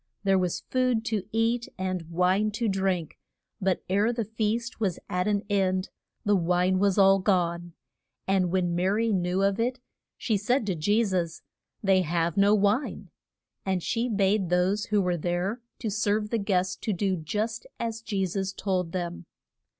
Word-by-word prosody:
There 195 -1 +3
was 180 -2 -1
food 255 -3 +1
to 215 -5 -2
eat 230 +2 +1
and 185 -3 -3
wine 185 +5 +2
to 230 +2 -1
drink, 190 -5 -1 0.4
but 190 -1 0
ere 205 +5 +2
the 230 -2 -2
feast 225 +3 -2
was 195 -6 0
at 180 +1 -1
an 205 -1 +1
end 190 -2 +1 0.4
the 205 0 +4
wine 180 +1 +2
was 200 0 +2
all 195 0 +6
gone. 175 -3 0 0.5
And 190 -2 +2
when 175 -2 +1
Ma 175 +1 0
ry 220 +4 +1
knew 185 -1 +1
of 200 +2 +1
it 250 +3 0 0.4
she 220 -4 0
said 230 +4 +1
to 195 - 0
Je 205 +8 +2
sus, 175 -4 -2 0.4
They 195 -1 +4
have 170 -1 0
no 200 +1 +5
wine. 210 +6 0 0.5
And 190 -3 -1
she 240 +1 0
bade 200 -3 +1
those 185 +4 +2
who 210 -3 +1
were 180 -1 0
there 175 +8 -2 0.2
to 220 -4 -3
serve 210 0 0
the 230 - +1
guests 190 -3 0
to 215 - -2
do 190 +1 0
just 210 +8 -3
as 230 -1 -3
Je 200 -4 -1
sus 190 +1 -2
told 185 -4 -2
them. 175 -1 -4
195 Hz, 175 wpm, -27 LUFS, 180-215 Hz, 0.5 s, all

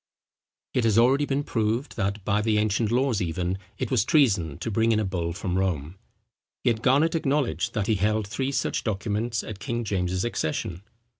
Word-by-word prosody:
It 125 - +1
has 110 -2 +3
already 135 +5 +4
been 140 +1 0
proved 115 +2 -1
that, 100 0 -2
by 105 0 +2
the 110 0 +1
ancient 105 +1 +1
laws 125 -3 +1
even, 90 +2 -2 0.2
it - - -3
was - - +3
treason 100 - +2
to 115 - -4
bring 115 +2 +2
in 110 - +3
a 110 - 0
bull 85 -3 -2
from 90 +2 -2
Rome; 90 -2 -2 0.6
yet 115 -2 +1
Garnet 140 +6 +3
acknowledged 145 -4 0
that 105 -2 0
he 110 - +2
held 105 +1 +1
three 130 +6 -2
such 130 -1 -1
documents 110 +2 -1
at 105 -3 -7
King 120 +3 -2
James's 95 -2 -1
accession. 85 -4 -2
110 Hz, 180 wpm, -26 LUFS, 95-120 Hz, 0.6 s, already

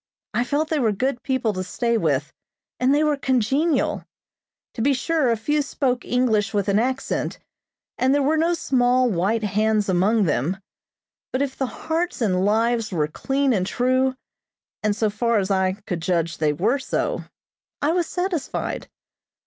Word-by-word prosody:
I 240 - +2
felt 300 +4 0
they 315 - +1
were 230 -5 +2
good 245 +4 -1
people 260 -5 0
to 185 -1 -3
stay 235 +5 -1
with, 150 -8 0 0.5
and 255 +1 +3
they 295 +2 +3
were 300 -1 +2
congenial. 270 +4 +1 0.7
To 230 - -4
be 275 +4 +3
sure, 300 0 +1
a 230 - +2
few 295 +7 0
spoke 260 -3 -1
English 220 -5 +1
with 200 -1 0
an 200 +1 +3
accent, 260 +3 -1 0.6
and 260 - +3
there 285 0 +3
were 300 +3 +2
no 335 +2 +2
small, 250 -4 +2
white 205 +5 0
hands 210 0 +1
among 200 +5 +3
them; 160 +2 0 0.7
but 260 +2 0
if 270 -2 -4
the 265 - -1
hearts 330 +6 -3
and 190 -6 +1
lives 225 +2 +1
were 155 -5 0
clean 270 - 0
and 185 -3 0
true, 255 +2 +1 0.7
and 210 -1 +1
so 215 -1 0
far 230 +2 +1
as 200 -1 0
I 190 -1 +2
could 175 -2 -3
judge 170 -1 -1
they 155 -1 +2
were 215 - +1
so, 265 - -2 0.5
I 295 - +1
was 345 -1 0
satisfied. 360 -4 -3
240 Hz, 170 wpm, -23 LUFS, 200-275 Hz, 0.7 s, and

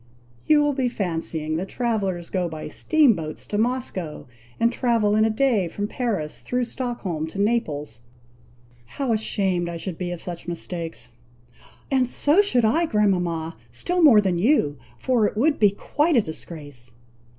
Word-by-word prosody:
You 300 -1 +5
will 290 -1 +2
be 260 -2 0
fancying 165 -6 -2
that 185 +3 -4
travellers 195 -8 -2
go 180 -2 0
by 155 -1 -6
steam 300 - +3
boats 155 -2 -6
to 205 - -3
Moscow, 225 -9 -2 0.3
and 235 +1 +3
travel 230 -5 +2
in 215 0 +4
a - - +2
day 220 -5 +2
from 205 +5 -3
Paris, 210 -11 -3
through 250 0 -1
Stockholm 230 -11 -3
to 160 - -9
Naples. 150 - -1 1.0
How 270 -4 0
ashamed 190 -5 0
I 170 - -5
should 170 0 -6
be 180 -1 -2
of 175 -1 -5
such 175 -1 -7
mistakes!" 165 -6 -5 0.8
"And 260 -2 +3
so 295 +8 +4
should 250 - +2
I, 325 +10 +2
grandmama, 180 - 0
still 350 - -1
more 255 -10 +8
than 185 -4 0
you; 195 - +3 0.2
for 240 -5 +2
it - - -6
would 290 +6 +2
be 210 - +6
quite 295 - 0
a - - +6
disgrace." 145 -7 -9
205 Hz, 160 wpm, -24 LUFS, 170-245 Hz, 1.0 s, more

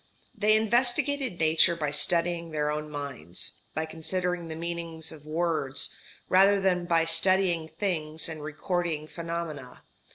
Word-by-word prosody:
They 215 0 +3
investigated 245 +1 +2
Nature 160 +2 +5
by 150 -3 -2
studying 170 +3 +2
their 150 -1 -1
own 150 0 -4
minds, 140 - -4 0.2
by 155 +1 -1
considering 175 +2 -3
the 160 - -6
meanings 165 -1 -5
of 155 -2 -13
words, 155 -4 -1 0.3
rather 195 +2 +5
than 180 -2 +1
by 165 -1 +2
studying 170 0 +3
things 160 -3 -2
and 160 -2 -6
recording 155 +1 -2
phenomena. 165 -5 -6
165 Hz, 130 wpm, -28 LUFS, 155-180 Hz, 0.3 s, Nature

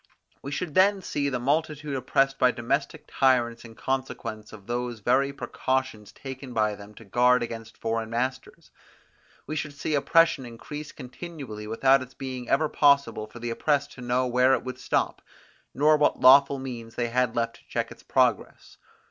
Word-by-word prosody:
We 140 - -6
should 155 +2 -3
then 195 +2 +4
see 140 -3 -1
the 130 - -1
multitude 145 +2 -1
oppressed 135 +1 +1
by 125 - +5
domestic 140 +5 -2
tyrants 120 -3 +1
in 115 -1 -12
consequence 115 -5 -4
of 105 -3 -12
those 120 0 -3
very 130 +6 +2
precautions 130 -6 -3
taken 130 +1 -9
by 105 -1 +2
them 105 +1 -12
to 115 - -13
guard 125 +4 +3
against 115 -1 -7
foreign 115 0 -2
masters. 130 +3 -4 0.7
We 155 - -5
should 150 -2 -4
see 145 +2 -3
oppression 165 0 +3
increase 145 +5 -8
continually 130 -5 -8
without 130 +4 +3
its 130 0 -10
being 130 -2 -6
ever 155 +3 +3
possible 140 -7 +2
for 110 - -13
the 120 0 -4
oppressed 145 +4 0
to 125 - -12
know 125 +1 0
where 125 +2 +4
it - - -5
would 130 0 -6
stop, - - -1 0.5
nor 150 +2 +4
what 150 - +2
lawful 140 +1 +7
means 120 -4 -7
they 120 -1 -1
had 125 -1 0
left 115 0 -1
to - - -26
check - - -3
its - - -12
progress. - - 0
130 Hz, 175 wpm, -26 LUFS, 115-140 Hz, 0.7 s, lawful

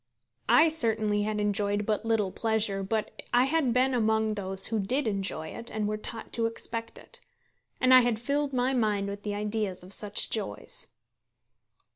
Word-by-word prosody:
I 315 - +7
certainly 220 -9 +1
had 210 0 -1
enjoyed 205 0 0
but 215 +1 -1
little 220 -4 +1
pleasure, 220 -3 0
but 215 +3 -2 0.2
I 245 +1 +4
had 275 -2 +1
been 255 +2 +2
among 220 -2 +1
those 190 -2 +3
who 225 -1 0
did 255 +9 0
enjoy 195 -7 -3
it 230 0 -9
and 215 -1 -2
were 215 - -1
taught 225 +2 -8
to 230 -1 +1
expect 230 0 -5
it. 485 - -15 0.6
And 255 0 +4
I 255 - +10
had 240 -2 +1
filled 280 +5 -1
my 255 0 +1
mind 210 -5 0
with 200 0 -6
the 205 0 -4
ideas 210 -3 -2
of 185 +2 -5
such 205 0 0
joys. 155 - -2
220 Hz, 175 wpm, -28 LUFS, 205-240 Hz, 0.6 s, I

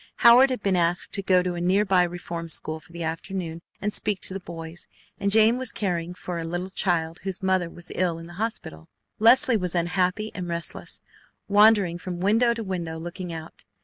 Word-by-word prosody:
Howard 245 +3 +8
had 255 -5 -3
been 195 -2 +2
asked 175 0 +1
to 200 - -2
go 185 -1 +3
to 180 -1 -2
a 175 - -4
nearby 190 +1 +3
Reform 170 -1 -4
School 155 0 0
for 160 - -21
the 170 0 -6
afternoon 165 +1 -4 0.2
and 210 0 -2
speak 205 -2 +1
to - - -1
the 195 - -4
boys, 165 -1 -6 0.3
and 200 - 0
Jane 220 +4 +5
was 260 -4 -2
caring 180 -3 -3
for 175 -1 -5
a - - -3
little 175 +3 -4
child 170 -4 -1
whose 190 +1 -4
mother 185 -2 +1
was 175 +1 -7
ill 175 -2 0
in 165 - -9
the 170 - -11
hospital. 80 - -4 0.3
Leslie 245 +3 +5
was 180 -3 -2
unhappy 180 +5 0
and 180 -2 -5
restless, 170 0 -5 0.4
wandering 205 -4 +4
from 180 -1 -6
window 225 +5 +3
to 230 - -4
window 175 -5 -4
looking 175 +2 -6
out. 160 -1 -9
180 Hz, 200 wpm, -25 LUFS, 170-205 Hz, 0.4 s, Howard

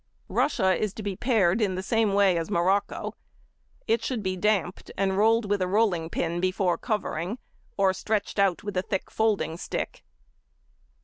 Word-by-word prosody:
Russia 190 -10 +2
is 210 +2 -2
to 215 - -6
be 200 -2 -3
pared 220 -4 +2
in 195 -3 +1
the 185 - -3
same 220 -1 +1
way 200 -3 +4
as 165 +1 -2
morocco. 195 +1 0 0.7
It 225 +1 +1
should 240 -5 -2
be 185 -1 -1
damped, 195 -1 0
and 190 0 +1
rolled 225 +2 +3
with 200 -1 0
a 185 - +1
rolling 185 -5 +1
pin 170 +1 -2
before 185 -1 +1
covering, 210 -2 -2 0.4
or 195 -1 +3
stretched 210 +1 -2
out 195 -3 +2
with 205 -2 -5
a 185 - +2
thick 195 0 -4
folding 210 -7 0
stick. - - -4
195 Hz, 170 wpm, -26 LUFS, 185-215 Hz, 0.7 s, way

